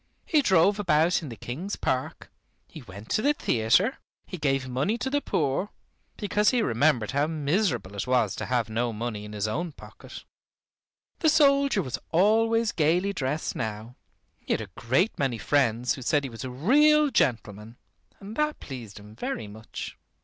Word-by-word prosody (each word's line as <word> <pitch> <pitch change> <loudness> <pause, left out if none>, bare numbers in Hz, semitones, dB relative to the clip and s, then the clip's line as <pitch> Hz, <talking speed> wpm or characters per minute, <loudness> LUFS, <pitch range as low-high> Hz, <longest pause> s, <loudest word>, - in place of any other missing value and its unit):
He 310 -3 +3
drove 195 -3 +3
about 170 -2 +2
in 155 - -7
the 115 - -7
King's 145 - -5
Park; 130 0 -3 0.4
he 155 - -11
went 100 -2 -12
to - - +1
the 290 +4 +2
theater; 150 - +2 0.3
he 180 - -8
gave 135 -2 0
money 135 - -1
to 265 +3 -3
the 290 +1 +1
poor, 150 - -1 0.5
because 210 0 +2
he 245 -3 +1
remembered 120 - +1
how 140 +2 +1
miserable 155 - -1
it 100 +5 -4
was 125 -5 +2
to - - -4
have 125 -3 0
no 115 +2 -1
money 110 -1 -4
in 105 - -9
his 105 0 -2
own 160 +9 -3
pocket. - - -12 1.0
The 315 - +3
soldier 280 - +4
was 130 - -4
always 225 +5 +3
gaily 175 +5 +1
dressed 150 -2 -2
now. 110 +1 -5 0.4
He - - -2
had - - -1
a 100 -4 -9
great 130 - 0
many 135 -4 0
friends 120 - +1
who 130 - -8
said 145 +4 +1
he 135 - -5
was 115 - -8
a 130 - -4
real 290 - +4
gentleman, 115 - -1 0.4
and 205 +2 -9
that 300 0 0
pleased 120 -7 -9
him 105 +1 -14
very 115 - -4
much. 110 +2 -9
140 Hz, 175 wpm, -26 LUFS, -, 1.0 s, soldier